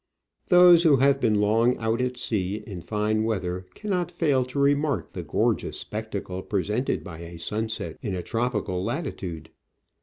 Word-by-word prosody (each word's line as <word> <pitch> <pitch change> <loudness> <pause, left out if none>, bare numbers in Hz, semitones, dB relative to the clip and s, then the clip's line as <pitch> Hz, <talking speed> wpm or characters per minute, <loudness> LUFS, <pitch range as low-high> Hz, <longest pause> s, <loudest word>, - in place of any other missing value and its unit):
Those 180 -2 +8
who 155 -5 +5
have 135 +1 +3
been 105 -2 +3
long 115 +4 +3
out 115 +2 0
at 125 0 -2
sea 105 -3 -2
in 95 -5 -7
fine 105 +4 0
weather 90 -4 -2
can 210 - -5
not 180 -2 0
fail 150 -7 +1
to 125 +3 -8
remark 140 +1 +1
the - - -5
gorgeous - - 0
spectacle 105 -4 -5
presented 105 +6 -1
by 85 -4 -9
a 85 0 -9
sunset 110 +6 -4
in 100 -4 -3
a 90 - -4
tropical 110 -6 -1
latitude. 95 - -4
110 Hz, 160 wpm, -25 LUFS, 95-135 Hz, -, Those